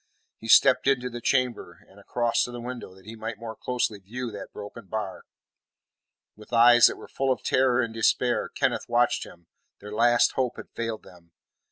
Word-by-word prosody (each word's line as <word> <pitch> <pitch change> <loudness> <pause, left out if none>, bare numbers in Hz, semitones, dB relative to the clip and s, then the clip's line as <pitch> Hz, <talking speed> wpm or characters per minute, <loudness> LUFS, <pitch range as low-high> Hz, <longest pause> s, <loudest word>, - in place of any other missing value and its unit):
He 115 - -9
stepped 130 +2 +5
into, 125 -2 +1
the 120 0 -7
chamber 125 -9 -1
and 100 - -19
across 120 +3 0
to 125 - -8
the 120 - -7
window, 120 -6 -7
that 95 0 -19
he 110 +1 -9
might 110 0 -6
more 110 0 -8
closely 120 -3 -2
view 120 +5 -6
that 100 -1 -9
broken 105 +1 -10
bar. 105 -2 -5 1.1
With 105 +2 -16
eyes 120 0 +7
that - - -3
were - - -12
full 135 -1 -1
of 130 - -2
terror 130 -1 +2
and 115 -2 -3
despair, 115 -1 +1
Kenneth - - -2
watched - - +1
him; 85 -1 -16 0.3
their 105 +1 -10
last 120 +2 +4
hope 130 -2 -2
had - - -10
failed 115 -1 -4
them. 85 -2 -18
115 Hz, 190 wpm, -26 LUFS, 105-125 Hz, 1.1 s, eyes